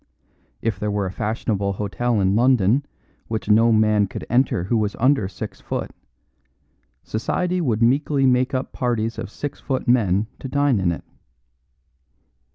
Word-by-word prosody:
If 110 -4 -1
there 105 0 -1
were 100 -1 -1
a 95 - -3
fashionable 105 -1 -2
hotel 105 +4 -1
in 95 +1 +2
London 120 +1 +3 0.4
which 110 -3 -4
no 115 +2 +5
man 110 -2 +3
could - - -7
enter 120 -7 +2
who 100 +6 -1
was 105 -2 0
under 130 -5 +2
six 100 - -8
foot, - - -4 1.1
society 180 +11 -1
would 115 -7 +1
meekly 135 +3 +2
make 130 +1 +2
up 130 - -3
parties 115 -3 -1
of - - -5
six 145 +6 -6
foot 130 -2 -3
men 105 -5 +3
to - - -6
dine 140 -3 +2
in 90 -2 +1
it. 85 - -5
115 Hz, 155 wpm, -22 LUFS, 105-130 Hz, 1.1 s, no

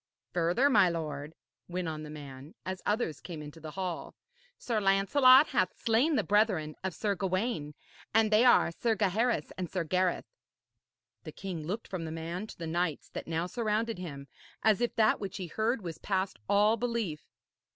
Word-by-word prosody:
'Further, 175 +10 +3
my 205 -9 +5
lord,' 155 -2 -4 0.3
went 180 0 -3
on 155 -1 -4
the 155 - -8
man, 145 -1 -10
as 185 0 -4
others 205 - 0
came 170 -4 -7
into 150 +2 -10
the 160 0 -8
hall, 185 -3 -4 0.4
'Sir 230 -3 -1
Lancelot 255 +8 +6
hath 185 -1 0
slain 245 +8 +2
the - - +2
brethren 200 -8 +2
of 190 -3 -3
Sir 205 +2 0
Gawaine, 185 - -2 0.4
and 220 0 +3
they 215 +2 +5
are 245 -8 +5
Sir 225 +6 0
Gaheris 210 -3 +1
and 180 -3 -3
Sir 185 -3 -1
Gareth.' 185 - 0 0.9
The - - -7
king 170 -6 -6
looked 210 +6 -4
from 180 -4 -4
the 160 - -5
man 170 +5 -4
to - - -11
the 170 - -5
knights 165 -1 -2
that - - -7
now 165 +1 -1
surrounded 220 +1 -1
him, 140 -6 -7 0.4
as 220 0 +4
if 240 - 0
that 220 -1 +3
which 195 -2 -5
he 185 - -4
heard 220 +6 -1
was 165 -3 -6
past 190 -1 -2
all 210 +3 +4
belief. 230 -10 -2
185 Hz, 180 wpm, -30 LUFS, 165-220 Hz, 0.9 s, Lancelot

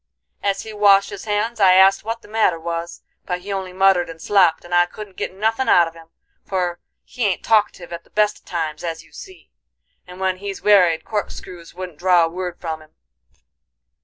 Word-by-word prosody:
As 195 -1 -1
he 220 - -9
washed 200 -1 +4
his 200 +1 -8
hands, 220 +2 -1
I 190 -2 +6
asked 190 +1 +5
what 230 +2 -5
the - - -14
matter 210 -6 +1
was; 170 +1 -5 0.2
but 180 -1 -3
he 200 +2 -5
only 190 -1 -4
muttered 190 -2 +3
and 165 0 -9
slopped, 175 -3 +3
and 175 - -8
I 175 0 +4
couldn't 205 +1 -10
git - - -4
nothin' 225 +6 -1
out 170 -1 +6
of 165 - -9
him, 165 -1 -15 0.4
for 180 -2 -2 0.2
he 240 -4 -2
ain't 190 - -2
talkative 205 -5 +1
at 170 0 -7
the - - -27
best 210 0 +1
of - - -37
times 160 -3 -4
as 165 -1 -4
you - - -23
see, 375 -2 -13 0.6
and 180 +1 -11
when 190 -1 0
he's 195 0 -7
werried 180 -6 +4
corkscrews 180 -5 -6
wouldn't 180 -4 -8
draw 180 -2 +4
a - - -3
word 180 0 -5
from 160 -2 -5
him. 155 - -20
185 Hz, 205 wpm, -21 LUFS, 170-205 Hz, 0.6 s, I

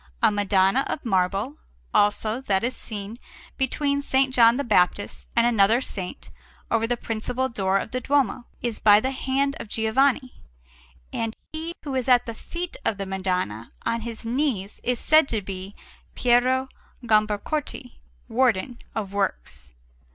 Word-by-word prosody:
A 225 - +6
Madonna 200 +3 +3
of 285 - -4
marble, 195 +7 0 0.4
also, 215 +3 +2
that 195 -6 0
is 250 +2 -1
seen 210 +1 -6 0.4
between 280 +2 0
S. 280 - -5 0.2
John 235 -1 +5
the 280 - -1
Baptist 205 -3 +1
and 235 - +4
another 225 -1 +4
Saint, 190 -8 -6 0.4
over 225 0 +2
the 245 +1 0
principal 240 +3 -2
door 195 -4 +1
of 210 - -4
the 255 - -2
Duomo, 265 -3 +1 0.2
is 235 -3 -1
by 205 -1 +7
the 260 +4 -1
hand 270 +1 0
of - - -6
Giovanni; 255 +5 +1 0.7
and 225 -1 -2 0.2
he 325 +2 -5
who 285 -3 -4
is 260 -1 -1
at 250 -2 +5
the 230 - -5
feet 345 +9 -6
of 205 - 0
the 195 - -4
Madonna, 185 - -2
on 230 0 0
his 230 0 -6
knees, 230 -5 -1
is 250 0 0
said 310 -2 +4
to 220 - 0
be 195 0 -7 0.4
Piero 255 +2 +3 0.4
Gambacorti, 215 - -1 0.3
Warden 245 -1 +1 0.2
of 200 -3 -3
Works. - - -3
230 Hz, 150 wpm, -24 LUFS, 200-260 Hz, 0.7 s, by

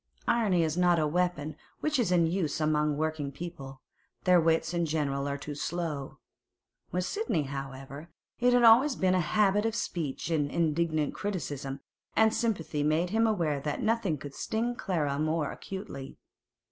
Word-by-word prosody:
Irony 200 -8 +3
is 160 +1 -1
not 175 -1 +4
a 155 - +2
weapon 155 -1 -1 0.3
much 305 -3 +1
in 180 -7 +3
use 165 -3 -1
among 150 -1 +1
working 155 -2 -2
people; 140 -3 -8 0.4
their 180 -2 +5
wits 165 0 +1
in 170 -1 0
general 140 -3 -1
are 140 0 -2
too 145 +1 -6
slow. 150 -2 -4 0.7
With 180 0 -1
Sidney, 410 - -1
however, 135 +2 -7 0.3
it 245 +1 +4
had 245 -1 +4
always 250 +5 +7
been 185 -1 +2
a 185 - +3
habit 205 +4 +2
of 225 0 -1
speech 165 -6 -3
in 145 -3 +1
indignant 155 -2 0
criticism, 145 -9 -4 0.3
and 220 0 +4
sympathy 180 -10 -1
made 155 +4 +1
him 225 +1 +3
aware 165 -9 0
that 145 +1 -3
nothing 215 -9 +1
would 145 -1 -7
sting 230 - -1
Clara 150 -10 -1
more 155 -1 0
acutely. 190 -9 -7
165 Hz, 160 wpm, -29 LUFS, 145-190 Hz, 0.7 s, always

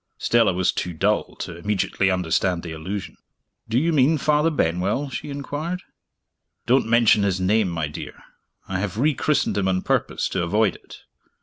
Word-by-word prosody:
Stella 115 -4 +3
was 90 0 +1
too 90 - -3
dull 80 - 0
to 85 - -6
immediately 95 +1 0
understand 90 -1 0
the 85 - -6
allusion. 85 +2 -6 0.5
"Do 115 - +1
you 165 +5 +2
mean 150 +2 +4
Father 150 +2 +2
Benwell?" 100 - 0
she 145 - -5
inquired. 145 +5 -4 0.8
"Don't 125 0 +3
mention 115 -2 +5
his 95 -2 0
name, 100 +2 +2
my 80 -3 -2
dear. 75 - -9 0.4
I 95 -1 -2
have 100 0 -3
re 150 +6 +3
christened 140 -6 0
him 95 - 0
on 95 -1 0
purpose - - 0
to 95 - -1
avoid 100 +3 +2
it. - - -14
100 Hz, 170 wpm, -23 LUFS, 90-135 Hz, 0.8 s, mention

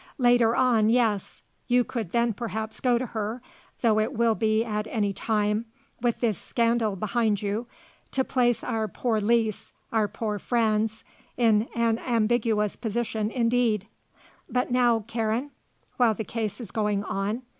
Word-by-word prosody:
Later 240 -3 +4
on, 235 -4 +3
yes; 225 -4 +1 0.2
you 245 0 +4
could 225 -8 -5
then 235 -1 +2
perhaps 220 -1 -4
go 245 -2 +3
to 255 - -2
her, 220 0 -4 0.4
though 220 -3 +3
it 220 +5 0
will 230 -1 +3
be 220 0 +1
at 210 -1 -2
any 205 -3 -1
time, 210 +1 0 0.3
with 240 -1 0
this 225 -5 +1
scandal 230 -4 +1
behind 215 +1 0
you, 210 +4 -2 0.4
to 265 - 0
place 240 -2 +1
our 225 -3 -1
poor 220 +2 -1
Lise, 220 0 +1 0.2
our 220 -2 +2
poor 210 0 -3
Franz, 220 -1 0 0.3
in 225 -2 +3
an 230 -1 +1
ambiguous 225 -3 +1
position 220 -1 -2
indeed. 230 -4 +1 0.6
But 250 0 -1
now, 240 -2 +3
Karen? 230 +4 -1 0.5
While 235 -3 +4
the 220 - -3
case 215 -3 -3
is 230 -6 -8
going 210 -2 0
on? 205 +5 -2
225 Hz, 150 wpm, -26 LUFS, 215-240 Hz, 0.6 s, Later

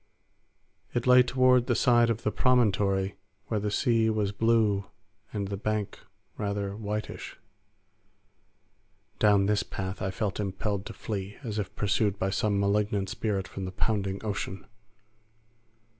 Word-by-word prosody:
It 120 - 0
lay 125 0 +8
toward 125 0 +3
the 120 - +2
side 120 0 +4
of 115 0 -1
the 105 - +1
promontory 100 -6 +2 0.3
where 110 - 0
the 105 +1 -1
sea 115 0 +2
was 105 -2 0
blue 105 -2 +2 0.5
and 100 -2 -3
the 100 - -3
bank 110 0 -2 0.4
rather 100 -1 -2
whitish. 105 0 -5 1.8
Down 105 -2 +5
this 105 0 +2
path 95 0 -5
I 95 - -1
felt 95 +1 -2
impelled 100 0 -2
to - - -7
flee, 100 -2 -5
as 110 -3 -3
if 100 - -4
pursued 100 0 +1
by 95 0 -1
some 100 0 +1
malignant 100 -1 +1
spirit 100 -3 -2
from 95 0 -6
the 95 - -4
pounding 100 -1 -1
ocean. 100 -2 -4
105 Hz, 140 wpm, -28 LUFS, 100-110 Hz, 1.8 s, lay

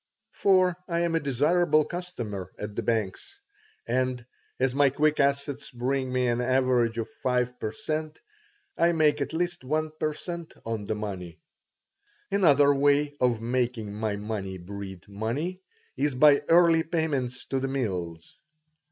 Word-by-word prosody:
for 185 -2 +3
I 170 -1 0
am 170 -1 0
a 165 - +3
desirable 155 +3 +2
customer 120 - -5
at 105 0 -6
the - - -2
banks; 115 - -2 0.5
and, 125 0 0 0.3
as 130 0 +2
my 140 0 +4
quick 150 +3 +1
assets 140 0 0
bring 130 +1 -2
me 125 0 +1
an 120 0 +1
average 125 -2 +2
of 115 - -2
five 125 -1 -1
per 110 - -3
cent., 155 +4 -4 0.6
I 170 0 +3
make 150 -2 +3
at 140 - -2
least 175 0 -2
one 155 +3 -1
per 155 -1 -1
cent. 170 0 -7
on 110 -2 -3
the 110 - -2
money 95 -5 -6 0.9
Another 145 -7 +5
way 145 +1 +2
of 120 -3 +2
making 120 -3 -1
my 105 0 -2
money 100 -2 -4
breed 95 0 -8
money 120 - -3 0.3
is 140 0 0
by 145 +2 +6
early 165 -1 +6
payments 150 -7 -2
to 135 - -1
the 135 - -2
mills. 90 -11 -4
130 Hz, 150 wpm, -27 LUFS, 115-155 Hz, 0.9 s, by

